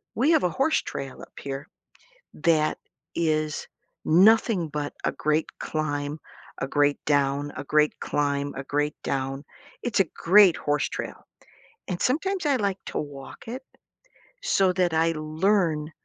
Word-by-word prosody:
we 270 +8 +3
have 320 - +4
a 180 - +3
horse 270 - +1
trail 135 -1 -6
up - - -12
here 140 +2 -5 0.7
that 155 -1 +2 0.4
is 155 -2 0 0.4
nothing 195 +1 +5
but 145 -1 -3
a - - +1
great 155 +1 0
climb, 145 -1 -2 0.4
a 135 - -2
great 145 0 +2
down, 145 0 +1
a - - -5
great 150 +1 +2
climb, 140 -1 -1
a 135 - -5
great 145 +2 -1
down. 135 +1 -2 0.4
It's 240 -5 0
a - - +6
great 190 0 +6
horse 145 0 0
trail, - - -5 0.7
and 180 -2 -3
sometimes 355 +7 0
I 280 -3 +3
like 200 -4 0
to - - -3
walk 140 -2 -8
it 255 +3 -6 0.8
so 190 -2 +3
that 175 -2 +1
I 165 +1 +3
learn 155 0 +1
155 Hz, 145 wpm, -26 LUFS, 145-190 Hz, 0.8 s, a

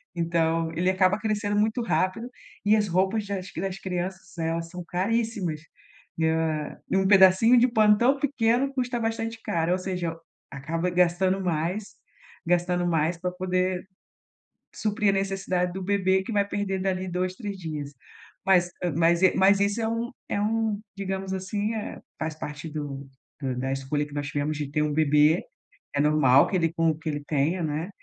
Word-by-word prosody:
Então 165 -1 0
ele 180 +3 +1
acaba 185 +2 +3
crescendo 210 -1 -1
muito 220 +3 +1
rápido 230 +1 -1 0.4
e 210 +1 +5
as 210 -1 +1
roupas 190 +4 +1
das 195 -1 -4
das 195 0 -3
crianças, 190 -1 -5
elas 165 0 -2
são 180 +1 -7
caríssimas. 190 -3 -1 0.6
Ah, 160 -2 0
e - - +2
um 190 0 +2
pedacinho 195 +5 +6
de 245 +1 +5
pano 215 -2 +5
tão 260 +5 +3
pequeno 265 -1 +1
custa 250 -2 -1
bastante 225 0 -2
caro 165 0 0
ou - - +1
seja, 180 -3 -3 0.4
acaba 165 +5 -2
gastando 180 +2 +2
mais, 175 +4 -1 0.6
gastando 175 +1 +1
mais 165 0 +1
pra 180 +1 -2
poder 185 0 -1 0.9
suprir 210 -1 +1
a - - +1
necessidade 190 -2 -1
do 190 +1 -5
bebê 190 -1 +2
que 210 - -6
vai 200 -1 +2
perder 200 -2 -2
dali 185 -1 -1
2, 180 +1 -2
3 205 -1 -5
dias. 150 -4 -6 0.5
Mas, 180 -2 +4
eh, 175 - +1
mas 170 +3 +3
e 185 - +5
mas 195 +1 +5
esse 200 +3 +1
é 220 - 0
um 230 +1 -2 0.2
é - - -1
um 220 0 0 0.2
digamos 190 -1 -3
assim, 205 +3 -2
eh 220 - -5 0.2
faz 155 0 -3
parte 150 +2 -6
do 140 -3 -6 0.3
do 130 -3 -2
da 130 +1 -2
escolha 135 +2 -1
que 145 - -16
nós 145 -1 -3
tivemos 145 +2 -2
de 145 -2 -4
ter 150 +1 0
um 150 -1 0
bebê. 150 +2 +4 0.5
É 145 - +1
normal 145 -3 +5
que - - 0
ele 165 -2 +2
com 165 -1 +2
o 155 - -3
que 160 0 -5
ele 145 -1 -3
tenha, 155 +5 0
né, 155 +2 -2
185 Hz, 180 wpm, -26 LUFS, 160-205 Hz, 0.9 s, pedacinho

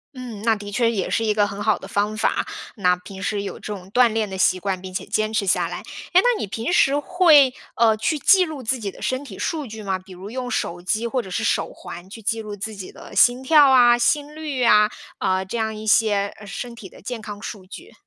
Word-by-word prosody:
嗯， 240 -5 -8
那 225 -1 +3
的 205 0 -8
确 230 +2 +2
也 195 -5 -2
是 225 - 0
一 215 - +2
个 205 -1 +2
很 200 0 -7
好 215 -1 +2
的 190 - -10
方 205 +2 -1
法。 - - 0 0.3
那 180 -5 +2
平 190 +2 -11
时 205 -2 -1
有 200 - -5
这 210 - -6
种 190 -1 -10
锻 245 +1 +5
炼 220 -2 -1
的 190 - -6
习 185 0 +3
惯， 190 -1 -2
并 185 -1 -9
且 - - -4
坚 215 0 -1
持 205 -3 0
下 175 -1 +2
来。 175 - -5 0.4
哎， 370 - +7
那 - - +2
你 - - -2
平 225 - -4
时 280 -5 +4
会， 310 -6 +5 0.2
呃， 225 -2 +3
去 295 +8 -1
记 370 +4 +5
录 310 -4 -7
自 255 +2 -1
己 200 -3 -4
的 - - -15
身 260 +2 -2
体 200 -8 -10
数 310 -4 -2
据 220 -1 -9
吗？ 195 -2 -2
比 185 0 -14
如 190 +3 -9
用 250 +1 -4
手 175 +1 -2
机 215 +6 -1
或 255 - -1
者 190 - -10
是 - - -2
手 - - 0
环 175 +2 -10
去 225 - -9
记 225 +1 -1
录 210 -1 -6
自 215 +2 -6
己 195 -2 -8
的 - - -13
心 245 +1 +5
跳 290 -1 +6
啊、 240 -2 +6
心 290 +5 0
率 295 -5 -3
啊， 210 -2 +6 0.3
呃， 185 0 0
这 210 +5 -5
样 220 -1 -1
一 215 0 -8
些 205 -2 +3
呃 205 - -11
身 235 +4 -6
体 210 -4 -10
的 - - -16
健 245 +2 -5
康 210 -1 -8
数 195 -3 -7
据？ 185 - -12
215 Hz, 275 characters per minute, -22 LUFS, 200-250 Hz, 0.4 s, 哎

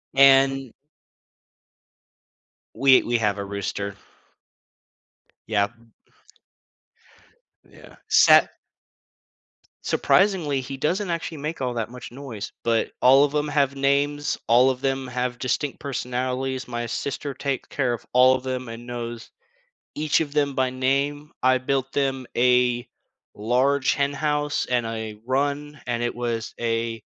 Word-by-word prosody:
And 135 -1 +5 2.0
We 135 -1 +5
we 120 0 +1
have 105 -2 0
a 100 - -4
rooster. 100 0 -4 1.5
Yep, 100 -1 +1
m 115 -1 -25 1.8
Yeah, - - -16
sat - - +6 1.3
Surprisingly, 175 -9 +2
he 135 +2 -7
doesn't 180 +7 -1
actually 165 -1 -3
make 150 +1 -5
all 125 -2 -1
that 115 -2 -3
much 125 0 -10
noise, 125 -5 -7
but 115 -1 +1
all 135 +3 +7
of 145 - 0
'em 150 0 0
have 140 -2 +1
names, 145 +1 +1
all 125 +3 +5
of 130 0 -3
them 135 -1 -1
have 125 -1 -3
distinct 135 +2 -2
personalities, 130 -1 -3
my 120 -1 -4
sister 140 +3 -4
take 135 0 -3
care 125 -4 0
of 115 - -7
all 130 +1 +6
of 130 - -5
them 130 -1 -4
and 115 +1 -8
knows 120 -1 -6 0.6
each 155 +1 +1
of 145 -3 -3
them 145 -2 +1
by 130 -1 +1
name, 140 +3 -1
I 130 0 +4
built 135 +1 -2
them 135 -2 -1
a 125 0 +2 0.5
large 130 +5 +2
hen 140 0 0
house 150 0 -1
and 125 -2 0
a 110 -1 -5
run, 145 +3 -2
and 120 -1 -2
it 120 - -2
was 120 -2 -3
a 115 -1 -2
130 Hz, 135 wpm, -24 LUFS, 120-140 Hz, 2.0 s, all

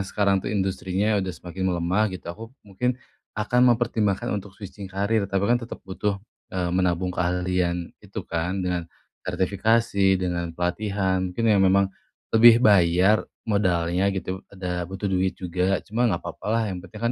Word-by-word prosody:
sekarang, 100 -2 +2
tuh, - - -4
industrinya 100 +1 0
udah 95 - -3
semakin 90 +1 -4
melemah, 90 +4 +1
gitu, 95 -1 -8
aku 115 +4 -10 0.2
mungkin 120 +5 -1 0.4
akan 125 +4 +3
mempertimbangkan 115 -5 +1
untuk 100 -1 -5
switching 100 -1 -9
karir. 100 +2 0
Tapi 100 0 0
kan 120 +3 +2
tetap 115 - -7
butuh, 100 +1 -2 0.3
eee, 90 -2 -2
menabung 90 0 +1
keahlian 90 -1 -1
gitu, - - -7
kan, 90 +3 -2
dengan 90 -2 -2 0.3
sertifikasi, 100 0 +2
dengan 90 -2 -2
pelatihan, 95 +1 0
mungkin 115 +6 -3
yang 100 - +4
memang 95 0 +3 0.4
lebih 115 +2 +7
bayar, 95 0 +4 0.2
modalnya, 90 -3 +1
gitu, 95 -1 -3
ada 90 -3 -4
butuh 95 +2 -7
duit 95 -1 0
juga. 90 +1 -1
Cuma 120 +3 +1
nggak 85 -4 -2
papa, - - -7
lah. 115 +1 +2
Yang 90 - -8
penting 110 - -11
95 Hz, 155 wpm, -24 LUFS, 90-105 Hz, 0.4 s, lebih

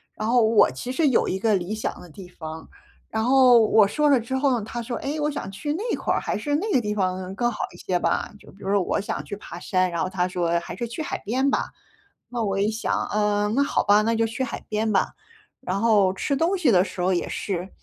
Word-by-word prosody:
然 215 - -3
后 245 0 +4
我 220 -1 +5
其 190 - -6
实 300 +3 +2
有 260 - +2
一 190 - -2
个 215 0 +2
理 185 +2 -2
想 220 - -4
的 180 - -12
地 180 +3 -11
方， 160 -2 -9 0.4
然 220 0 -1
后 255 -2 +6
我 215 -1 +5
说 300 +8 +1
了 275 - +5
之 235 +3 -4
后， 265 -4 +1
他 220 +3 -6
说： 240 +1 -4
“哎， 290 +3 -3
我 295 0 0
想 280 - -5
去 290 +10 -3
那 370 - -4
块 - - -1
儿， - - 0
还 - - -2
是 290 -1 -3
那 415 +6 -2
个 - - +4
地 210 -1 -2
方 185 -2 -2
更 240 +3 +1
好 215 - -8 0.2
一 - - -13
些 180 - -1
吧，” 175 - -1
就 - - -16
比 - - -20
如 190 - -5
说 205 - +4
我 195 - -1
想 200 - -4
去 200 - -5
爬 175 -3 -9
山， 185 0 +1
然 170 +1 -2
后 185 - -2
他 180 -1 0
说 170 -2 0
还 170 - -8
是 235 -1 -4
去 235 +7 -6
海 - - -3
边 260 +6 +1
吧。 - - -1 0.6
那 240 -2 -2
我 195 -2 -1
一 205 +2 +2
想， 220 +1 -1
嗯， 210 0 +1
那 280 - +3
好 - - 0
吧， 205 0 +5
那 225 +2 +1
就 225 0 +2
去 225 +4 -4
海 245 - -5
边 215 +1 0
吧。 - - +1 0.5
然 185 +2 -2
后 205 -4 +3
吃 280 +8 -1
东 340 +7 +1
西 310 -9 +2
的 180 -3 +5
时 195 - -8
候 185 +1 +2
也 175 - -1
是。 185 -2 -3
215 Hz, 280 characters per minute, -24 LUFS, 190-250 Hz, 0.6 s, 后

